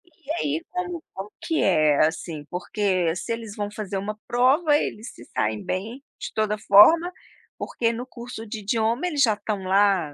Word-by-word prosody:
E 300 - -8
aí 155 - -2
como 360 -2 -4
como 200 +2 -7
que 325 -1 0
é, 155 -5 +4
assim, 160 -1 -4
porque 180 -2 0
se 185 - -5
eles 225 -3 -5
vão 205 0 -4
fazer 205 -2 -4
uma 210 +2 -4
prova 275 +6 +3
eles 225 -4 -4
se 120 - -13
saem 105 0 -2
bem 225 +9 -4 0.2
de - - -6
toda 215 -1 0
forma, 320 - +6 0.5
porque 230 -1 -1
no 245 +2 -5
curso 240 -2 -9
de 220 0 -6
idioma 225 - 0
eles 300 -5 -1
já 230 -5 +5
estão 205 -2 -4
lá 190 -5 +2
210 Hz, 180 wpm, -24 LUFS, 185-245 Hz, 0.5 s, forma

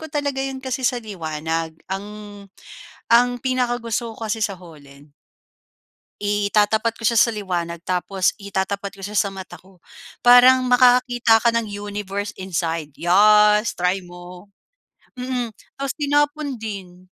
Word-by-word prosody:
ko 315 - -8
talaga 285 -2 -2
'yon 270 0 -3
kasi 260 0 -4
sa 245 - +2
liwanag. 160 -5 -4 0.2
Ang 195 +1 -4 1.0
ang 240 +1 +5
pinakagusto 240 -3 -2
ko 225 - -6
kasi 220 +1 -2
sa 200 - -5
holen. 145 -4 -16 1.1
Itatapat 210 +2 +1
ko 225 - 0
siya 235 - +1
sa 230 +1 +5
liwanag, 175 -5 -4
tapos 185 +1 0
itatapat 200 -1 -4
ko 195 - -17
siya 205 +2 -6
sa 200 -1 +1
mata 190 -1 -9
ko. 185 -1 -20 0.4
Parang 250 +1 +6
makakakita 245 -2 +4
ka 235 - 0
ng 225 -3 -1
universe 205 0 -5
inside. 165 -4 -3
Yas 210 +4 +5
try 180 +2 -1
mo. 175 +2 -13 0.6
Mm, 250 -2 -4 0.2
tapos 275 -1 -3
tinapon 290 -1 0
din. 195 -5 -8
210 Hz, 135 wpm, -21 LUFS, 185-245 Hz, 1.1 s, Parang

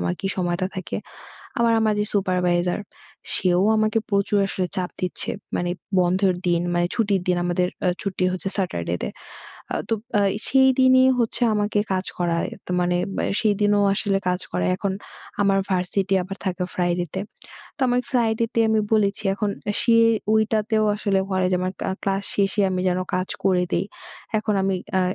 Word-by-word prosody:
আমার 90 0 -1
কি - - -3
সময়টা 180 0 0
থাকে। 185 - -4 0.6
আবার 235 -1 +3
আমার 215 -1 +2
যে 210 - +1
সুপারভাইজার 180 -2 +1 0.5
সেও 180 0 +2
আমাকে 215 +1 +2
প্রচুর 200 +1 +2
আসলে 185 -1 -1
চাপ 180 -1 -2
দিচ্ছে। 180 - -2 0.3
মানে 175 0 -1 0.3
বন্ধের 185 +1 +2
দিন 170 -1 +2
মানে 175 0 +2
ছুটির 200 -4 +1
দিন 180 - +3
আমাদের 180 0 +1 0.2
আ - - +4
ছুটি 190 -2 -1
হচ্ছে 185 +1 -3
স্যাটারডে 85 - -2
তে। - - -1 0.6
আ - - -1
তো 225 - +2 0.3
আ - - +3 0.3
সেইদিনই 260 -1 +5
হচ্ছে 235 +1 -1
আমাকে 210 0 0
কাজ 185 0 0
করায়। 170 -1 0 0.2
তো - - -8
মানে 175 0 +1 0.2
মে - - 0 0.2
সেইদিনও 205 -1 +2
আসলে 195 -1 0
কাজ 180 0 0
করায়। 90 0 0
এখন 195 -1 -2 0.5
আমার 195 -1 +3
ভার্সিটি 190 +2 0
আবার 195 +2 -7
থাকে 180 0 -1
ফ্রাইডেতে। 175 0 -1 0.6
তো - - -15
আমার 245 0 +2
ফ্রাইডেতে 230 -2 +1
আমি 220 -1 +3
বলেছি 205 -1 +2
এখন 205 0 -1 0.3
সে 230 -1 +4 0.4
ঐটাতেও 220 0 +2
আসলে 200 -2 +1
বলে 185 -1 +1
যে - - +3
আমার 185 0 -1
ক্লা - - -1
ক্লাস 195 0 0
শেষে 200 +1 +1
আমি 185 0 -1
যেন 180 0 +1 0.2
কাজ 185 +1 -1 0.2
করে 185 -2 +3
দেই। - - +1 0.5
এখন 215 -1 -1
আমি 195 0 +1 0.2
আ - - +3
195 Hz, 165 wpm, -23 LUFS, 180-210 Hz, 0.6 s, সেইদিনই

